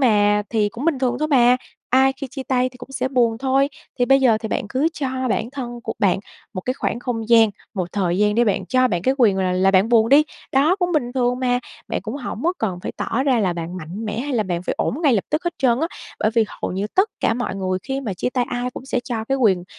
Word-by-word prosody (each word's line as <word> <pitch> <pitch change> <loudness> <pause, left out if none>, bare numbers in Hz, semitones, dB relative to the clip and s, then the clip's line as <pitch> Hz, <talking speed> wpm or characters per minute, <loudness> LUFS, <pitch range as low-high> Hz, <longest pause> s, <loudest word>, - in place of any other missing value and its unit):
mà 210 -4 +3
thì 215 -2 +2
cũng 235 +6 -7
bình 320 -5 +1
thường 250 -2 0
thôi 305 +1 -1
mà, 250 -3 +5 0.3
ai 265 +1 +4
khi 275 +1 -7
chia 270 0 -5
tay 255 -1 +1
thì 255 - -16
cũng 250 +2 -12
sẽ 260 - -1
buồn 240 -4 +2
thôi. 270 +2 +2 0.3
Thì 245 - +3
bây 270 +2 +4
giờ 235 -5 +4
thì 220 - -5
bạn 205 - -2
cứ 265 +8 +1
cho 260 -3 -2
bản 225 +1 -1
thân 240 -3 -6
của 225 - -3
bạn 195 -3 +2 0.4
một 185 - -3
cái 255 +7 -2
khoảng 240 - -2
không 225 -3 -3
gian, 225 -2 +6 0.2
một 180 -3 -3
thời 185 -3 0
gian 210 0 +3
để 240 +2 +3
bạn 205 -4 0
cho 255 0 +3
bạn 175 -5 -1
cái 260 +7 +2
quyền 215 -6 +4
là 185 -1 +1
là 185 +1 +3
bạn 195 +3 +4
buồn 230 -1 +4
đi, 285 +4 +6 0.3
đó, 295 +7 +4
cũng 355 -2 -1
bình 250 -7 0
thường 250 -1 +1
mà. 245 -1 +2 0.3
Bạn - - -2
cũng 220 - -5
hổng 245 -4 -6
có 345 - +2
cần 190 -5 -2
phải - - -4
tỏ 250 - -1
ra 265 -3 +2
là 190 -4 +1
bạn 170 +1 -5
mạnh 185 +6 -6
mẽ 215 0 -3
hay 285 +2 -3
là 225 - +2
bạn 175 -3 -3
phải - - -2
ổn - - 0
ngay 290 -5 +4
lập 200 - 0
tức 305 +3 -1
hết 345 -1 -1
trơn 250 -2 +2
á, 325 - +1 0.3
bởi 215 - +2
vì 230 -2 +4
hầu - - -5
như 195 +3 -2
tất 385 +3 +4
cả - - +2
mọi 245 -3 -3
người 185 -1 -1
khi 270 +5 -3
mà 220 -8 -4
chia 250 - -2
tay 250 -1 0
ai 245 0 -2
cũng 255 - -9
sẽ 255 -2 -1
cho 225 -3 -3
cái 270 +4 0
quyền 190 -8 +3
245 Hz, 280 wpm, -21 LUFS, 210-265 Hz, 0.4 s, gian